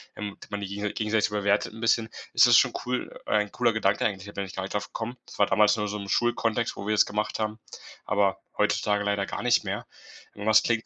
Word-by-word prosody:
ähm, 105 -1 -4
und - - -15
man 105 0 -3
die 100 - -4
gegensei 105 +1 -3
gegenseitig 105 0 +1
bewertet 100 0 0
'n 115 - -10
bisschen. 115 0 +2 0.2
Es - - +7
ist - - +7
schon - - +4
cool 125 0 -3
ein 105 -1 +1
cooler 120 -1 +2
Gedanke 105 -2 +1
eigentlich, 95 -3 -2
da 100 - -9
bin 100 - -3
ich 95 - -10
gar 95 - -3
nicht 95 - -6
drauf 105 - -2
gekommen. 120 +2 -5
Das - - -12
war 100 - +6
damals 105 +1 +4
nur 105 -1 -1
so 105 +1 -3
im 100 -1 -7
Schulkontext, 120 0 +1
wo 100 - -7
wir 110 - +2
das - - +5
gemacht 105 +1 -2
haben, 110 0 -2 0.5
aber 100 -1 +1 0.2
heutzutage 105 0 +1
leider 100 -1 0
gar - - -5
nicht - - +3
mehr. - - -4 0.5
Aber 105 +1 0
es 110 - +7
klingt 115 -1 0
105 Hz, 250 wpm, -27 LUFS, 100-110 Hz, 0.5 s, Es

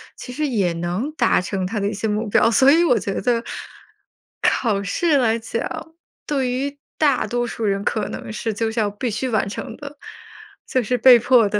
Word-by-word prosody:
其 250 - -9
实 305 +3 -1
也 200 -10 0
能 175 - -3
达 240 - +2
成 185 0 -3
他 210 +3 -3
的 200 - 0
一 - - -4
些 215 +2 -2
目 215 +1 -1
标。 210 - +4
所 265 +4 +6
以 330 +3 +5
我 250 -9 +3
觉 195 0 -3
得， 235 +2 +1 1.0
考 210 -5 +1
试 290 +9 +1
来 230 -3 +2
讲， 230 +8 -5 0.3
对 270 -4 0
于 275 +3 -3 0.2
大 285 -5 +2
多 240 0 -1
数 230 - -5
人 200 0 0
可 210 -1 -1
能 - - -7
是 220 0 -3
就 220 +2 -1
是 225 - -2
要 210 - +1
必 205 +4 -3
须 250 +5 -2
完 215 -4 +1
成 195 - -6
的， 290 -1 -10 0.7
就 255 - +1
是 250 +3 0
被 245 0 +8
迫 240 -3 +4
的。 210 0 0
230 Hz, 225 characters per minute, -21 LUFS, 205-260 Hz, 1.0 s, 被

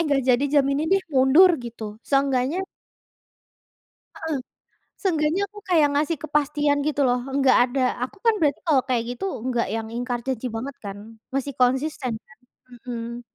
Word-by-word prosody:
nggak 280 -2 +2
jadi 245 +4 +2
jam 285 -1 +3
ini 300 +3 -1
deh, 390 +2 +3
mundur," 275 +8 +6
gitu 225 -3 -8
seenggaknya 275 +5 +1 1.5
Heeh, 320 -1 -3 0.7
seenggaknya 325 -1 +1
aku 420 +1 -12
kayak 320 -5 +5
ngasih 305 +3 0
kepastian 295 -1 +1
gitu 295 -1 0
loh. 245 0 +2 0.2
Nggak 270 -2 +5
ada, 260 +2 -2 0.2
aku 255 - -6
kan 455 - +6
berarti 295 -4 +1
kalau 285 -5 +4
kayak 245 -3 +1
gitu 390 - -5 0.2
nggak 240 -2 0
yang 225 -1 -3
ingkar 245 0 -2
janji 255 -1 -2
banget 255 +4 -5
kan, 200 0 -5 0.4
masih 275 +1 -2
konsisten 260 0 +1
kan? 215 - -19 0.5
Hmm. 235 -1 -5
275 Hz, 155 wpm, -24 LUFS, 245-300 Hz, 1.5 s, mundur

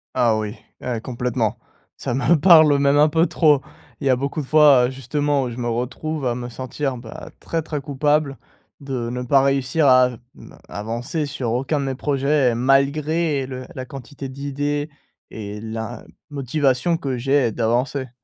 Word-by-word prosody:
Ah 120 -3 +3
oui. 105 +1 -4 0.3
Eh 120 -3 -3
complètement, 120 -2 -2 0.4
ça - - -4
me 140 +6 +3
parle 155 -4 +7
même 140 +1 +3
un 150 +1 +5
peu 165 +3 +2
trop. 150 -4 +3 0.4
Il - - -1
y - - +3
a 130 - +5
beaucoup 140 +4 -3
de - - -7
fois, 145 -5 +6
heu, - - -4
justement, 140 +2 -1
où 125 - -4
je 115 - -8
me 120 -1 -3
retrouve 130 +5 -3
à 120 - +1
me 120 0 -5
sentir, 130 +2 -4
bah, 120 -2 -10
très, 165 -1 -2
très 150 -1 -4
coupable 145 0 0 0.4
de 130 -4 -4
ne 125 - -4
pas 135 +2 +3
réussir 140 +2 +1
à 130 -1 +6
v 125 - -9 0.2
mmh, - - -14 0.2
avancer 120 - -3
sur 130 -4 -3
aucun 135 +5 0
de 140 - -2
mes 135 - -2
projets 140 -1 +1
et - - -2
malgré 140 +3 +1
le 130 -1 -7
la 130 -2 -5
quantité 135 +1 -8
d'idées 145 +2 -3 0.4
et 105 -1 -7
la 110 +1 -6 0.3
motivation 140 +3 0
que 135 -4 -3
j'ai, 135 -1 +2
d'avancer. 125 +4 -1
135 Hz, 180 wpm, -21 LUFS, 125-145 Hz, 0.4 s, parle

